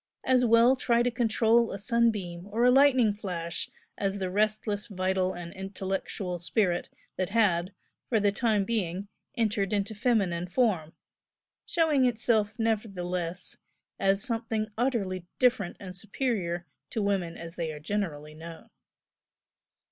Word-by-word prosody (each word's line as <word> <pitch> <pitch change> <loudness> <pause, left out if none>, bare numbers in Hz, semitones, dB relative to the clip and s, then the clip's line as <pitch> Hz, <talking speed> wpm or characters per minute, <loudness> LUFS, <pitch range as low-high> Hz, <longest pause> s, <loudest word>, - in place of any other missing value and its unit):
As 255 -1 +3
well 235 +2 +6
try 240 -2 +2
to 245 - +1
control 230 0 +3
a - - -4
sunbeam 205 -6 0
or 225 +4 +1
a 250 - +7
lightning 260 -5 +5
flash 175 -5 -4 0.3
as 195 0 0
the 185 -2 -3
restless 210 0 0
vital 185 -2 0
and 175 0 -8
intellectual 190 -1 -4
spirit 175 0 0 0.3
that 185 -1 -1
had, 195 -5 +2 0.4
for 225 - +3
the 205 -1 +3
time 210 -1 +1
being, 195 -3 -2 0.3
entered 210 -4 +1
into 205 +1 0
feminine 195 -6 +1
form, 180 -6 +1 0.7
showing 305 -6 +3
itself 225 -3 +2
nevertheless 185 -6 -2 0.4
as 195 +1 +3
something 225 -3 -1
utterly 200 -8 -1
different 240 -8 +2
and 185 -2 -8
superior 190 -5 -2 0.2
to 220 - -2
women 190 -4 -1
as 165 0 -8
they 165 -2 -2
are 150 - -8
generally 155 -4 -3
known. 165 +1 -11
205 Hz, 135 wpm, -28 LUFS, 180-230 Hz, 0.7 s, a